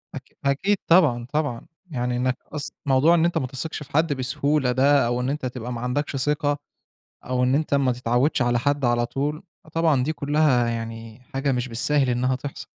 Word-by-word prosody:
أك - - -11
أكيد 190 +9 +2
طبعًا، 150 -9 +4
طبعًا، 145 -6 -1 0.3
يعني 125 -3 -1
إنّك 130 +1 0 0.2
أص 145 -2 -4
موضوع 140 +5 +4
إن 165 -1 +3
أنت 170 -1 +1
ما 130 - -1
تثقش 150 +4 -5
في - - -16
حد 160 0 +2
بسهولة 135 +1 0
ده، 140 +1 +4
أو 120 +1 -1
إن 125 - -1
أنت 145 -1 -3
تبقى 125 -1 -5
ما 115 - -5
عندكش 135 +4 -2
ثقة، 145 +2 0 0.7
أو 125 0 0
إن 130 +2 +3
أنت 155 -1 -1
ما 140 -2 +3
تتعودش 125 +4 +1
على 120 -1 +2
حد 140 +1 0
على 120 0 +2
طول، 145 +5 -3 0.2
فطبعًا 160 -5 +1
دي 155 - -1
كُلّها 145 -5 +2
يعني 115 0 -6
حاجة 135 +1 0
مش 125 0 -1
بالساهل 135 +4 +1
إنّها 125 +1 +1
تحصل. 140 +2 -7
135 Hz, 190 wpm, -24 LUFS, 125-150 Hz, 0.7 s, طبعًا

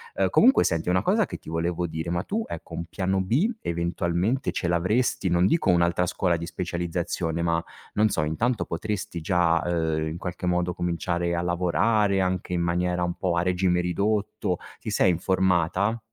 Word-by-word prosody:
Ehm, - - +2
comunque 260 +3 +5
senti, 85 0 0
una 90 +1 +2
cosa - - +2
che - - -6
ti - - -21
volevo 85 +2 -1
dire. 80 0 -4
Ma 85 +1 -1
tu, 220 - -2
ecco, - - -8
un 85 - -4
piano 95 +2 -1
B 125 - +2
eventualmente 85 +7 -1
ce 85 - -2
l'avresti? 95 +4 +1
Non 85 +1 +3
dico 160 - +2
un'altra 85 0 +3
scuola 85 -1 0
di 85 - -5
specializzazione, 85 -1 -2
ma 85 0 +1 0.3
non 110 +1 +3
so, 85 - 0
intanto 110 +11 0
potresti 90 -1 -4
già, 85 0 +2
ehm, 80 -2 0
in 80 +2 -4
qualche 90 0 -5
modo 90 0 +1
cominciare 85 0 -1
a 85 - -1
lavorare 95 +4 +2
anche 90 -1 -1
in 85 - 0
maniera 90 +1 0
un 85 0 -1
po' 90 -1 -1
a 85 - +2
regime 90 0 +1
ridotto. 100 +4 0 0.3
Ti - - -6
sei - - +3
informata? 95 +4 +1
90 Hz, 180 wpm, -25 LUFS, 85-95 Hz, 0.3 s, comunque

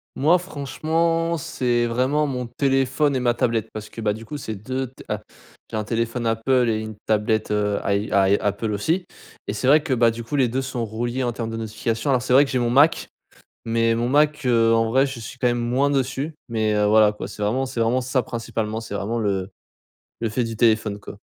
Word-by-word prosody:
Moi 160 +6 +4
franchement, 165 +1 -1
c'est 120 -3 0
vraiment 130 +6 +1
mon 125 -3 -3
téléphone 135 +3 +1
et - - +1
ma 120 -1 +2
tablette 115 -3 0
parce 105 -1 -7
que, - - -10
bah, 105 -2 0
du 110 +2 -9
coup 150 +6 -6
c'est 110 -5 -5
2 130 +6 -3
t 130 - -15
a - - -3 0.5
j'ai - - -4
un 110 - -1
téléphone 115 +2 -2
Apple 120 +2 +2
et 110 -1 0
une 110 -1 -7
tablette, 110 0 +1
heu, 105 -1 0
ay 100 +1 0
ay 100 0 +4
Apple 105 +2 -1
aussi, 165 - -1 0.4
et - - -2
c'est - - -3
vrai 150 +3 +6
que 145 - -5
bah, 115 -1 +4
du 115 +1 -7
coup 145 - -5
les 135 -3 +3
2 130 +3 -1
sont 130 -3 -3
reliés 120 +4 -3
en 120 - 0
termes 115 0 -4
de 115 - -4
notification. 115 +4 -2
Alors 130 -2 +2
c'est 125 - -4
vrai 140 +3 +7
que - - -6
j'ai 130 - +1
mon 120 - +1
Mac, 145 +6 +4 0.6
mais 115 0 +2
mon 120 +2 -1
Mac, 150 +1 +2
heu, 115 -2 +4
en 115 0 +2
vrai 135 +3 +4
je 135 -2 -6
suis 115 +3 -9
quand 125 - +1
même 120 0 +2
moins 125 +4 +1
dessus, 140 +2 -1 0.2
mais, 110 -2 +1
heu, 105 0 +2
voilà 105 0 +5
quoi 105 - -7
c'est 105 +1 -8
vraiment 120 +6 +1
c'est 130 -2 -4
vraiment 120 +3 +2
ça 130 +1 0
principalement, 115 -1 -4
c'est 110 - -7
vraiment 105 +4 -2
le 100 -3 -1 0.7
le 115 - 0
fait 115 +4 -1
du 115 -1 -4
téléphone 110 -3 +2
quoi. 100 0 -11
120 Hz, 230 wpm, -23 LUFS, 110-130 Hz, 0.7 s, vrai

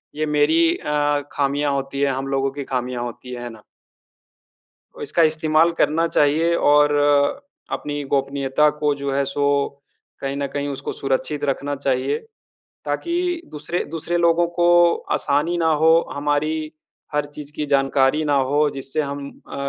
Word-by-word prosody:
ये 155 +1 -1
मेरी 155 +3 +3
अ, 145 0 0
खामियाँ 145 +1 0
होती 140 0 -3
हैं, 140 -1 +2
हम 135 +1 -3
लोगों 135 0 0
की 140 +1 -6
खामियाँ 125 -2 -3
होती 120 +1 -8
है, 120 -1 -6
है 120 - -5
ना? 110 -2 -13 1.3
और - - -7
इसका 155 +4 +2
इस्तेमाल 155 +1 +3
करना 160 +3 +2
चाहिए 160 +2 +2
और, 145 - +3 0.3
अपनी 145 0 -3
गोपनीयता 140 +1 +1
को 150 -1 +2
जो 140 0 -3
है 140 0 +1
सो 140 +1 -2 0.8
कहीं 135 0 -3
न 140 0 -2
कहीं 145 0 -2
उसको 140 - -5
सुरक्षित 140 +2 -2
रखना 140 +1 -2
चाहिए। 135 0 0 0.7
ताकि 340 0 -2 0.4
दूसरे 150 +4 -3
दूसरे 165 +2 -2
लोगों 170 0 +3
को 175 - +4 0.5
आसानी 150 +5 0
ना 165 -1 +2
हो, 160 - +6 0.2
हमारी 155 +2 -1 0.4
हर 150 0 +1
चीज़ 150 -1 -9
की 150 - -2
जानकारी 135 +2 +2
ना 145 -1 +1 0.2
हो, 150 +1 +3
जिससे 135 +2 -3
हम 140 -1 -5
अ, - - -14
145 Hz, 155 wpm, -21 LUFS, 140-155 Hz, 1.3 s, हो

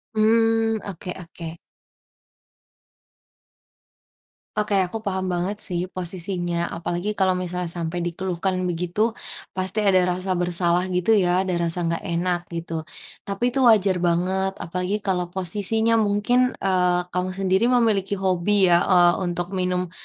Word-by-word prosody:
Mmm. 225 0 +3
Oke 185 -1 -6
oke. 170 -1 -8 3.0
Oke. 210 -1 +1
Aku 220 +5 -6
paham 190 -3 -2
banget 185 +4 -2
sih 175 -4 -1
posisinya, 175 -1 -2
apalagi 175 +4 -3
kalau 190 -1 +3
misalnya 180 0 -3
sampai 170 +1 -3
dikeluhkan 185 +1 -2 0.2
begitu 175 +4 -2 0.5
pasti 190 +3 -1
ada 195 -2 +4 0.2
rasa 185 +1 -3
bersalah 175 0 +2
gitu 180 +4 0
ya, 180 -1 +2
ada 185 -1 -2
rasa 170 +1 -1
nggak 165 0 -2
enak 175 +1 0
gitu. 165 -1 -4 0.4
Tapi 200 +5 -1
itu 270 - -2
wajar 200 -5 +5
banget, 180 +2 0
apalagi 180 +4 -2
kalau 185 -3 -1
posisinya 210 +5 +1
mungkin, 220 +4 +2
eee, 180 -2 +2
kamu 180 +1 -2
sendiri 190 +3 +1
memiliki 220 -6 +2
hobi 190 0 +2
ya, 170 - +6
eee, 175 -2 +5
untuk 175 0 -2
minum, 180 -1 -1
185 Hz, 130 wpm, -23 LUFS, 175-200 Hz, 3.0 s, ya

